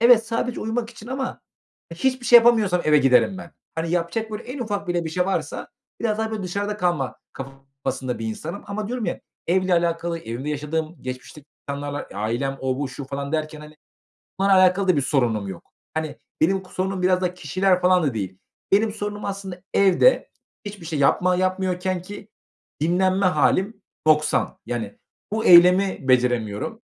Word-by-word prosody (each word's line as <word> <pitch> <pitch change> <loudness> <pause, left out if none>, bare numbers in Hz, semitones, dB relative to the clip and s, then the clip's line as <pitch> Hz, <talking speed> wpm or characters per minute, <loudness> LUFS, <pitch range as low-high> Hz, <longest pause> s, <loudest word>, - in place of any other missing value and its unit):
evet 235 -1 +6
sadece 230 +1 -2
uyumak 225 +1 -2
için 230 -1 -13
ama 260 +1 -4 0.5
hiçbir 255 +7 -1
şey 240 - +9
yapamıyorsam 220 -7 +3
eve 150 -1 +5
giderim 135 +8 +3
ben. 170 - -10 0.2
Hani, 165 0 -2
yapacak 175 +6 -1
böyle 210 +2 -5
en 255 +3 -7
ufak 205 -5 -3
bile 175 -1 0
bir 160 - -4
şey 180 +3 0
varsa 195 - -3 0.3
biraz 220 -2 0
daha 220 0 -1
böyle 215 -2 -4
dışarıda 200 +3 -3
kalma 175 -9 -1 0.2
kafasında 135 -1 -6
bir 115 - -4
insanım 160 - -5
ama 205 +1 -4
diyorum 245 -1 -3
ya - - -3 0.3
evle 185 +1 +2
alakalı 170 0 0
evimde 120 +2 -5
yaşadığım, 155 +3 -3
geçmişteki 130 +3 -8 0.2
insanlarla, 145 0 -4
ailem 120 +7 -2
o, 130 0 -1
bu, 145 -1 -2
şu 135 +2 -7
falan 140 +2 -5
derken 155 -1 -2
hani, 150 0 -13 0.6
bunlarla 195 -1 +5
alakalı 185 +1 +3
da 180 - +4
bir - - +3
sorunum 115 -8 0
yok. 95 -3 -10 0.2
Hani, 155 -1 -3 0.2
benim 190 +4 +2
k 185 - -18
sorunum 190 0 -2
biraz 185 0 +3
da 180 0 -1
kişiler 185 0 +1
falan 180 -1 +4
da 140 -5 0
değil. 95 -3 -4 0.3
Benim 210 +2 +4
sorunum, 205 -1 -5
aslında, 195 -3 -5
evde 200 - +4 0.4
hiçbir 205 -4 -8
şey 160 -2 -3
yapma 180 +6 +3
yapmıyorkenki 185 +1 -2 0.5
dinlenme 185 +3 +2
hâlim 190 +3 +1 0.2
noksan. 155 -1 +2
Yani, 115 -4 -4 0.3
bu 220 +1 -1
eylemi 180 -3 +6
beceremiyorum. 120 -5 +1
180 Hz, 165 wpm, -23 LUFS, 145-200 Hz, 0.6 s, şey